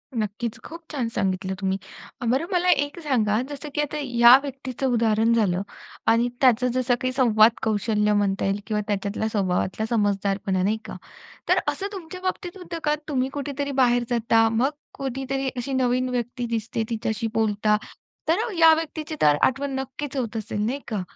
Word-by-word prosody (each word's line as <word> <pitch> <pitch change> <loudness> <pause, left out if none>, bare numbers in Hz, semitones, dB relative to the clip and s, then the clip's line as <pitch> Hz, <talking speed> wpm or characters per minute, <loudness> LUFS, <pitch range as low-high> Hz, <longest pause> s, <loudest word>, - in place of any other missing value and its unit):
नक्कीच. 220 +2 -3
खूप 335 +1 -9
छान 265 -6 -1
सांगितलं 190 -3 -1
तुम्ही. 190 -1 0 0.5
बरं 265 +7 +1
मला 360 0 +2
एक 285 -2 +1
सांगा, 225 -6 +1
जसं 290 +1 -7
की 295 - +2
आता 295 +1 -3
या 240 -2 +7
व्यक्तीचं 270 -1 -4
उदाहरण 225 0 +3
झालं 195 -6 +2 0.5
आणि 230 +2 +4
त्याचं 250 -1 +4
जसं 255 -1 +2
काही 255 - 0
संवाद 230 -4 +5
कौशल्य 210 -1 +1
म्हणता 200 -1 +1
येईल 195 +1 0
किंवा 210 -2 0
त्याच्यातला 205 +1 -1
स्वभावातला 195 0 -1
समजुदारपणा. 200 -3 0
नाही 210 +3 +1
का? - - -7 0.5
तर - - +5
असं 395 - -1
तुमच्या 365 -1 -8
बाबतीत 370 0 -3
होतं 350 -2 -6
का? 300 0 +2
तुम्ही 265 -3 0
कुठेतरी 285 0 -4
बाहेर 245 -1 +3
जाता, 230 -1 +3
मग 230 +4 +2 0.2
कोणीतरी 270 0 -3
अशी 250 +3 -3
नवीन 255 0 +1
व्यक्ती 245 0 -3
दिसते 230 0 -2
तिच्याशी 225 0 -2
बोलता. 210 -1 +2 0.5
तर 325 +2 +3 0.2
या 325 -1 +8
व्यक्तीची 315 -1 -4
तर 145 -1 +5
आठवण 275 +2 +1
नक्कीच 270 +1 -5
होत 235 -3 -2
असेल. 210 -1 -3
नाही 260 +5 -1
का? 215 -5 -2
240 Hz, 165 wpm, -24 LUFS, 215-275 Hz, 0.5 s, या